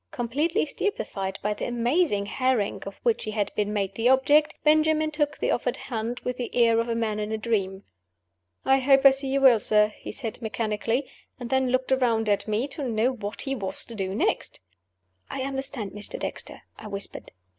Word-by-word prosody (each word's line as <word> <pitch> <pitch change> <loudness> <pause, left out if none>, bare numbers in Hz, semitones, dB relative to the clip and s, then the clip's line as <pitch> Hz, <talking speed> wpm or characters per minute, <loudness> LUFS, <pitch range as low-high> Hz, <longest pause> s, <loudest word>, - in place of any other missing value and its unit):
Completely 295 - 0
stupefied 200 - -3
by 210 +1 +1
the - - -4
amazing 240 - +1
harangue 255 -2 0
of 195 - -8
which 235 -2 +1
he - - -3
had 210 -1 -2
been 210 0 -1
made 200 -2 -1
the 230 +2 +2
object, 290 +3 +4
Benjamin 310 0 +3
took 300 -1 -1
the - - 0
offered - - -1
hand, 235 0 -4
with 250 0 -3
the 245 - -5
air 230 -2 +4
of 230 +1 -1
a 230 - 0
man 220 -2 -1
in 210 0 -3
a 220 - -1
dream. 200 -4 -1 0.8
"I 270 0 +4
hope 270 +1 +4
I 275 - +11
see 270 +1 -3
you 275 +1 +1
well, 255 -4 +7
sir," 210 0 +3
he - - -7
said, 225 -1 -5
mechanically 225 +3 -1 0.3
and 240 -2 -6
then 265 -1 +2
looked 255 +1 0
around 230 -4 +2
at 205 +1 +1
me, 215 +5 0
to 280 +1 -6
know 235 0 +1
what 210 -4 -6
he 270 - -2
was 195 -6 -3
to 235 - -10
do 190 -3 -3
next. - - -1 0.7
"I - - -4
understand 270 -5 -4
Mr. 210 0 -4
Dexter," - - -5 0.2
I 215 - -8
whispered. 200 -1 -5
235 Hz, 200 wpm, -26 LUFS, 210-270 Hz, 0.8 s, I